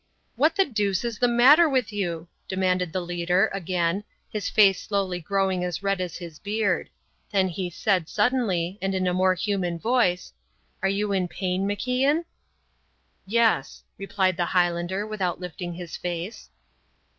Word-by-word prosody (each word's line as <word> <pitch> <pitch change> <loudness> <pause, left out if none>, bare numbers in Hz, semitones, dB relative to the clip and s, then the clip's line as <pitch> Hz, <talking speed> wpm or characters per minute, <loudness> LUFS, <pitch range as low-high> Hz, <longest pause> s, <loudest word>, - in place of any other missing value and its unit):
"What 305 +7 +3
the 390 - +4
deuce 205 - -1
is 235 -3 -4
the 245 - +4
matter 270 +8 +6
with 255 -6 0
you?" 175 -5 -3 0.2
demanded 185 -2 0
the 185 - -2
leader, 175 +3 +1
again, 180 0 -1 0.3
his 210 -3 -2
face 200 -3 +5
slowly 195 -3 -1
growing 190 +1 0
as 180 +2 -3
red 195 -1 0
as 180 -2 -4
his 170 -4 -9
beard; 205 -3 -1 0.4
then 190 -2 +2
he 180 +1 -3
said, 180 -1 0
suddenly, 205 -6 0
and 195 0 -1
in 185 0 0
a 180 - +1
more 185 0 +3
human 185 -2 -1
voice, 220 -3 +1 0.5
"Are 195 - +2
you 200 +1 -1
in 190 -2 +1
pain, 185 +1 -2
MacIan?" 255 - +1 1.0
"Yes," 225 -9 +1 0.2
replied 190 -2 0
the 175 - +1
Highlander, 175 +2 0
without 195 -6 -2
lifting 175 -1 -6
his 175 -2 -7
face. 175 +4 -5
190 Hz, 155 wpm, -25 LUFS, 180-210 Hz, 1.0 s, matter